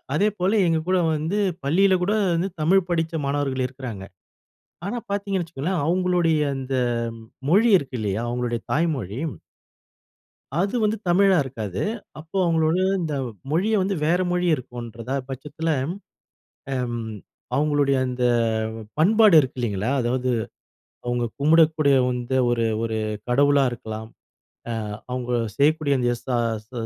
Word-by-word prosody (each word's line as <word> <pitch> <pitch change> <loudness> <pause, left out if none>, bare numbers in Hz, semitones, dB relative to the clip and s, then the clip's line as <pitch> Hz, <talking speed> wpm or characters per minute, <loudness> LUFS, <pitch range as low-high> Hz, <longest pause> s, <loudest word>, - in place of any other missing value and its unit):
அதேபோல 205 +2 +2
எங்க 165 -1 +2
கூட 185 - +3 0.2
வந்து 160 +6 -1 0.3
பள்ளியில 190 +7 +3
கூட 205 - +1 0.2
வந்து 170 +4 0
தமிழ் 180 +3 +3
படிச்ச 165 -1 0
மாணவர்கள் 140 -2 0
இருக்குறாங்க. 125 -7 -7 0.8
ஆனா, 240 +4 -2
பார்த்தீங்கன்னு 200 -2 -1
வச்சுக்கோங்களேன், 165 +2 -2
அவங்களுடைய 175 -2 +2 0.2
அந்த 135 0 -4 0.7
மொழி 215 +7 +5
இருக்கு 135 -3 -6
இல்லையா? 105 0 -1
அவங்களுடைய 120 -1 -2
தாய்மொழி. 140 - -1 1.4
அது 195 +5 0
வந்து 215 +1 +1
தமிழா 195 +2 +5
இருக்காது. 110 -8 -5 0.4
அப்போ 160 +5 -6
அவங்களோட 160 0 +2 0.2
இந்த 155 -3 -2 0.4
மொழிய 195 +7 +1
வந்து 195 +1 0
வேற 175 +4 +2
மொழி 180 0 +1
இருக்குன்றத 120 -2 -8 0.2
பட்சத்தில, 150 +5 -4 1.0
அம் 125 -2 -2 0.6
அவங்களுடைய 145 -1 +2
அந்த 125 -1 -2 0.7
பண்பாடு 210 +4 +5
இருக்கு 130 -3 -2
இல்லைங்களா? 105 -1 -1
அதாவது 125 +1 0 0.8
அவங்க 120 0 -1
கும்புடகூடிய 155 -1 +4
வந்து 125 +1 -2
ஒரு 115 -1 +1 0.2
ஒரு 115 -1 -2 0.3
கடவுளா 140 +2 +4
இருக்கலாம். 110 -2 -7 0.8
அ - - -5 0.2
அவங்க 125 -1 -3 0.3
செய்யக்கூடிய 145 0 +3
அந்த 120 - +1
எஸ் 120 0 -12
ச - - -2 0.4
ச - - -49
145 Hz, 125 wpm, -23 LUFS, 125-175 Hz, 1.4 s, மொழி